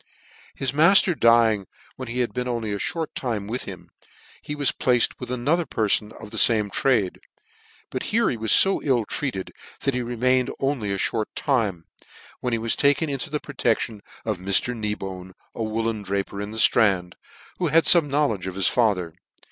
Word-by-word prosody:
His 135 - -1
mafter 175 +6 +5
dying 115 - +3 0.3
when 130 - -7
he 125 +2 -2
had 120 - -2
been 125 0 -3
only 115 -4 -2
a 100 - -3 0.2
more 165 -1 -1
time 115 -6 -3
with 120 +5 -4
him, - - -10 0.5
he 150 - -5
was 145 -2 +1
placed 125 -2 +1
with 125 - -7
another 140 +8 0
per 110 -4 -1
fon 105 +1 +1
of 105 -2 -11
the 110 - -2
fame 105 -3 +3
trade: 110 -8 +1 0.7
but 130 - -3
here 230 +2 +2
he - - 0
was 110 -1 -2
fo 195 0 +3
ill 125 -6 +1
treated 100 -6 -4 0.3
that 140 - 0
he 125 - -1
remained 125 +2 +1
only 135 -7 -1
a 100 - -1 0.2
mort 110 -2 -2
time, 105 - -1 0.5
when 125 - -2
he 115 - +1
was 115 0 +1
taken 145 +2 +2
into 135 +2 -4
the 150 +1 -2
protection 115 -6 -2 0.2
of 110 -5 -2
Mr. 100 +6 +1
Knee 105 -2 -2
bone, 95 -2 -8 0.2
a - - -6
whoollen 110 0 -2
draper 100 0 -3
in 105 - -5
the 110 - -8
itrand, 95 -5 +3 0.5
who 180 - +1
had 165 +2 +4
fome 165 -5 +5
knowledge 135 -10 0
of 95 - -5
his 95 - +2
father. 100 -9 +1
115 Hz, 190 wpm, -24 LUFS, 105-135 Hz, 0.7 s, mafter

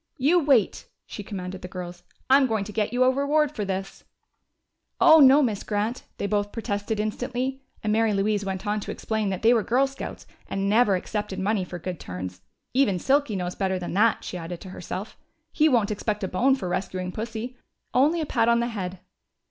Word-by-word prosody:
"You 310 +6 +4
wait!" 265 -8 +2 0.2
she - - -7
commanded 190 -2 -6
the - - -6
girls, 175 -1 -7 0.3
"I'm 270 0 +5
going 220 -4 0
to 210 - -8
get 210 -1 -1
you 250 +1 +3
a 255 - +5
reward 285 +2 +1
for 210 - -2
this!" 195 0 -4 1.0
"Oh, 320 0 +8
no, 280 +1 +7
Miss 215 -6 -1
Grant!" 215 +4 -2
they - - -2
both 205 0 0
protested 210 -1 -3
instantly, 250 +5 -2 0.2
and 210 -1 +1
Mary 225 0 +3
Louise 205 +1 +1
went 190 0 -4
on 210 +1 0
to - - -8
explain 220 -2 -2
that 190 +1 -4
they 230 +2 +6
were 230 - +3
Girl 250 +5 +2
Scouts 275 0 -7 0.2
and 195 0 -2
never 210 -1 +4
accepted 205 +1 -3
money 195 +1 0
for 180 0 -7
good 180 -1 -5
turns. 90 0 -7 0.3
(Even 250 -8 +3
Silky 270 - +1
knows 180 -1 -2
better 190 -1 -1
than 175 -2 -5
that, 215 +4 +3
she 180 - -5
added 170 +1 -6
to 190 - -9
herself. 185 +3 -7 0.3
He 310 0 +3
won't 230 -6 +2
expect 210 0 -2
a - - 0
bone 260 +9 +3
for 195 -9 -5
rescuing 185 0 -3
Pussy 230 +4 -5 0.4
only 300 +6 +3
a - - -1
pat 230 -5 +1
on 235 0 +4
the 235 0 0
head!) 185 -5 -5
210 Hz, 205 wpm, -25 LUFS, 190-250 Hz, 1.0 s, Oh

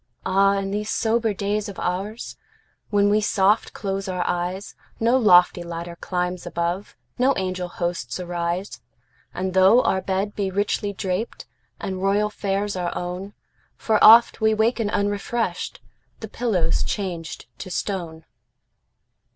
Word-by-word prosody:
Ah, 195 +1 +3
in 195 0 -2
these 210 +1 -2
sober 225 0 +1
days 205 +1 -2
of 200 - -8
oursWhen 205 +1 -3
we 210 +1 +3
soft 205 +1 +2
close 195 0 -4
our 180 -1 -2
eyes, 180 +3 -3 0.3
No 230 +3 +3
lofty 180 -7 +5
ladder 170 0 -6
climbs 180 0 -3
above, 170 +4 -3 0.2
No 265 +2 +3
angel 185 -1 -2
hosts 175 -7 -3
arise. 175 +2 -3 0.5
And 185 0 -3
tho 190 +6 +6
our 190 - +1
bed 195 +2 -2
be 200 -2 -1
richly 205 +1 -1
drapedAnd 190 0 -5
royal 205 +2 +1
fares 200 0 -2
our 175 -1 -2
own, 180 +3 -5 0.4
For 220 -1 +1
oft 230 +1 +8
we 220 0 +3
waken 220 0 +1
unrefreshed—The 200 - -3
pillow's 200 -9 0
changed 180 -5 -4
to 185 - -7
stone! 175 -4 -4
195 Hz, 125 wpm, -23 LUFS, 180-210 Hz, 0.5 s, oft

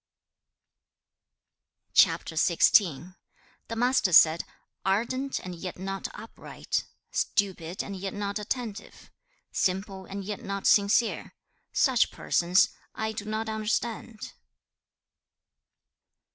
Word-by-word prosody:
CHAP. - - +5
XVI. 180 -1 +2 0.5
The 230 - -5
Master 245 -4 +2
said, 160 0 +6 0.4
'Ardent 240 +8 0
and 185 - -6
yet 175 +1 -7
not 195 +1 -4
upright; - - -5 0.3
stupid 185 -4 -1
and 200 - -6
yet 195 +1 -5
not 205 0 -3
attentive; 220 0 -6 0.4
simple 190 +1 -1
and 200 0 -6
yet 205 0 -5
not 200 0 -4
sincere: 205 +3 +3 0.4
such 260 -4 +3
persons 180 +2 +2 0.3
I 220 0 -2
do 215 -1 -6
not 215 +1 -3
understand.' 220 +1 -3
200 Hz, 95 wpm, -27 LUFS, 190-220 Hz, 0.5 s, said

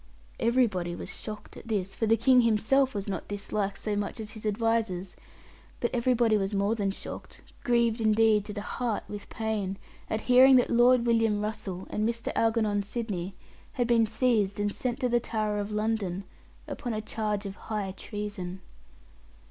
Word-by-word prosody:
Everybody 215 -8 +1
was - - -6
shocked 215 -1 -8
at - - -11
this, 195 -4 -1
for 225 - -1
the 225 +1 +4
King 250 +3 +5
himself 235 +4 +2
was 200 0 -3
not 190 -4 -4
disliked 205 0 -2
so 210 -1 -2
much 205 +3 -3
as 215 -1 -4
his 220 -1 -5
advisers; 215 -4 0 0.6
but 235 - 0
everybody 235 -2 +3
was 195 0 -1
more 200 +2 +2
than 205 -3 0
shocked, 195 - -8 0.2
grieved 235 -1 +2
indeed 220 -1 +4
to 210 - -5
the 205 0 -5
heart 235 0 -2
with 205 -1 -8
pain, 210 -3 -2 0.3
at 220 - -1
hearing 260 +1 +7
that 250 - +4
Lord 240 0 +5
William 225 -3 +2
Russell 200 -3 -4
and 215 +2 0
Mr. 230 0 -2
Algernon 220 -3 +2
Sidney 200 -4 -4 0.4
had 245 - 0
been 230 -1 +3
seized 215 -5 +1
and 205 0 0
sent 250 0 -3
to 250 - +2
the 240 0 +3
Tower 215 -2 -2
of 205 0 -3
London, 210 -3 -1 0.4
upon 240 -3 -4
a 215 - -2
charge 210 -1 -2
of 195 -1 -5
high 210 -3 -4
treason. 205 -4 -6
215 Hz, 170 wpm, -28 LUFS, 205-230 Hz, 0.6 s, hearing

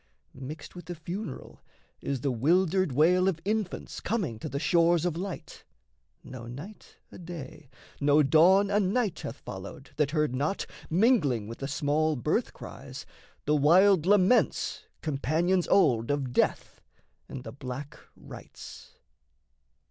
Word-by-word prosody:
Mixed 145 +5 -9
with 175 -2 -9
the 175 +1 -6
funeral 170 -1 -7 0.4
is 135 -3 -3
the 140 - 0
wildered 175 +7 +2
wail 175 +7 +4
Of 180 -4 0
infants 210 -2 -3
coming 185 - -2
to - - -5
the 140 - -4
shores 170 +2 +3
of 175 -3 0
light: 185 +1 -7 0.6
No 120 -3 -9
night 150 - -10
a - - -11
day, 155 -5 -9 0.3
no 145 +1 +4
dawn 180 +8 +5
a 205 - +3
night 200 -1 0
hath 115 - -6
followed 100 +6 -9
That 150 -2 +2
heard 150 -3 0
not, 145 +9 -1 0.2
mingling 160 - +2
with 115 - -8
the 135 - -4
small 150 +2 0
birth 120 - -1
cries, - - -10 0.4
The 150 - +2
wild 175 +4 +5
laments, 205 +3 +2 0.2
companions 160 +5 0
old 120 - +3
of 140 -3 -1
death - - 0 0.5
And 130 - -7
the - - -7
black 140 +2 -7 0.2
rites. - - -12
155 Hz, 140 wpm, -28 LUFS, 140-185 Hz, 0.6 s, dawn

